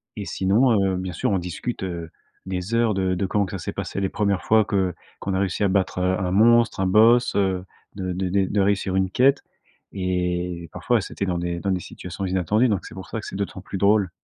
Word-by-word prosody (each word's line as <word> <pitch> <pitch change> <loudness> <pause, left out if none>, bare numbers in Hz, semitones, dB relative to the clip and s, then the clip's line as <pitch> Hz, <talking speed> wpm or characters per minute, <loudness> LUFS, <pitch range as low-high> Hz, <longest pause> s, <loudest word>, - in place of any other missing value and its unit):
et 105 - -5
sinon, 105 +6 +2
heu, - - -1
bien 90 -1 -4
sûr, 125 +5 -1
on 95 - +2
discute, 90 +6 -5
heu, 85 -3 -5 0.4
des 95 +3 -4
heures 115 -2 +3
de 95 -1 0
de 95 +2 -1
comment 100 +2 +1
que 90 - -9
ça 95 - -4
s'est - - -4
passé - - -4
les 95 - +1
1res 100 -2 0
fois 110 0 +4
que 95 -3 0 0.3
qu'on 100 - -3
a 95 - +1
réussi 95 0 -1
à 100 - +4
battre, 95 -1 0
heu, 95 +1 +1
un 90 -1 -1
monstre, 115 +2 +4
un 95 - +2
boss, 115 +5 +5
heu, 95 -2 +1 0.3
de 95 -2 -3
de 90 0 -2 0.2
de 105 - 0
réussir 100 -1 +1
une 95 0 +1
quête 135 +8 +3 0.5
et 90 -2 -2
parfois, - - 0
c'était 100 - -4
dans 90 -2 -1
des 85 0 -3
dans 100 +2 -1
des 95 - 0
situations 90 +2 -8
inattendues. 95 +6 +2
Donc, 100 -4 -1
c'est - - -10
pour 95 - -8
ça 115 - -3
que - - -9
c'est - - -7
d'autant 100 -1 -4
plus 95 - -6
drôle. 100 -1 +3
95 Hz, 235 wpm, -23 LUFS, 90-105 Hz, 0.5 s, boss